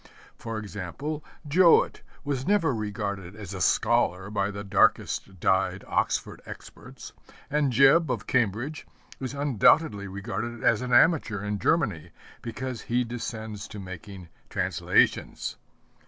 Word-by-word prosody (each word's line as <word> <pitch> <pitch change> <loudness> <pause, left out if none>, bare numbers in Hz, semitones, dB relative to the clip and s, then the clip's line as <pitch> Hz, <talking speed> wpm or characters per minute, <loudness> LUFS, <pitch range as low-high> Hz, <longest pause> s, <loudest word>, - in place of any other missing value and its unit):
For 115 -1 -6
instance, 110 - -5 0.3
Jowett 170 +3 +4 0.2
was 140 -3 -3
never 185 -8 +3
regarded 100 -3 -4
as 100 -3 -8
a 95 - -5
scholar 100 -1 +2
by 100 -1 0
the 100 0 -6
darkest 95 -1 +1
dyed 95 +2 +1
Oxford - - -1
experts, - - -11 0.4
and 145 -2 +2
Jebb 140 +6 +5
of 120 -5 -2
Cambridge 120 +5 -1 0.3
is 130 +1 -5
undoubtedly 140 -5 +3
regarded 100 +4 -5
as 115 0 +3
an 125 0 -4
amateur 120 - +4
in 105 0 -2
Germany, 85 - 0 0.3
because 125 0 -5
he 120 +1 0
descends 110 -3 -6
to 105 - -9
making 95 -1 -9 0.2
translations. - - 0
110 Hz, 125 wpm, -27 LUFS, 100-130 Hz, 0.4 s, Jebb